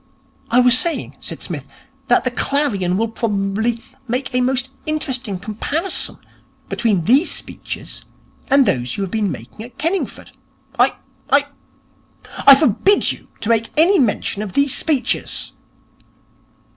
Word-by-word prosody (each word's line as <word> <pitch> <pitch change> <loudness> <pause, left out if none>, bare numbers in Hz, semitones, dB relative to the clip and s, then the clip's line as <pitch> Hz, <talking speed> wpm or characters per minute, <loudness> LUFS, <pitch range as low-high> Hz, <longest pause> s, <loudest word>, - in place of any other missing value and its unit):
'I 245 +2 +5
was 250 -1 +6
saying,' 340 -2 -1
said - - -5
Psmith, 145 -6 -5 0.4
'that 245 - +4
the 255 - 0
Clarion 225 -10 0
will 225 +2 +1
probably 220 +1 -1 0.2
make 250 +3 -3
a 250 - +2
most 260 +1 0 0.2
interesting 260 -9 -2
comparison 225 - -3 0.5
between 210 -7 +1
these 265 - +4
speeches - - -6 0.5
and 275 0 +5
those 125 - -1
you 200 - -1
have 190 - -5
been 215 -3 0
making 120 - -9
at 240 +3 -11
Kenningford.' 340 +5 -3 0.5
'I - - +4 0.3
I 285 0 +4 1.0
I 275 - +12
forbid 310 - +3
you - - -10
to 220 - -2
make 230 -1 +2
any 365 +5 +5
mention 210 -4 0
of 205 -3 -5
these 280 -1 +2
speeches.' 290 -6 0
245 Hz, 135 wpm, -19 LUFS, 205-280 Hz, 1.0 s, I